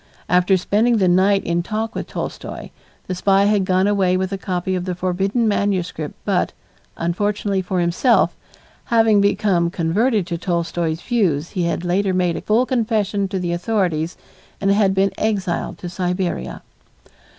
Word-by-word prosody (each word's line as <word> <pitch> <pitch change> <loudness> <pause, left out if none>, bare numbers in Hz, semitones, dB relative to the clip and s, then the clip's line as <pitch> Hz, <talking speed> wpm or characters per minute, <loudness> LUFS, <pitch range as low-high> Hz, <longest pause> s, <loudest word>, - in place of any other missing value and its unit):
After 180 +2 +3
spending 220 +6 +2
the 190 -3 +2
night 190 +3 +3
in 170 0 0
talk 215 +5 -3
with - - -5
Tolstoy, - - -6 0.3
the 185 - -3
spy 195 +2 +3
had 205 -2 +2
gone 185 +1 +2
away 195 -3 +2
with 190 +1 -2
a 195 - -2
copy 185 -1 -2
of 180 -1 -2
the 180 -1 -3
forbidden 195 +6 0
manuscript 185 -7 -1
but, - - 0 0.4
unfortunately 200 +3 -1
for 185 0 -2
himself, 175 +8 +2 0.5
having 225 -3 +4
become 200 -4 +2
converted 195 +5 +1
to 170 -2 -4
Tolstoy's 170 -2 -2
views 175 - 0
he 180 -4 -1
had 170 +1 -2
later 185 +2 +1
made 180 -2 +1
a - - -4
full 225 +4 +2
confession 215 -5 0
to 190 0 -3
the 175 -2 -2
authorities 175 -4 -1 0.4
and 195 0 +2
had 200 -1 +3
been 195 0 +2
exiled 200 -5 -1
to 180 - -7
Siberia. 180 - -3
190 Hz, 160 wpm, -20 LUFS, 175-205 Hz, 0.5 s, having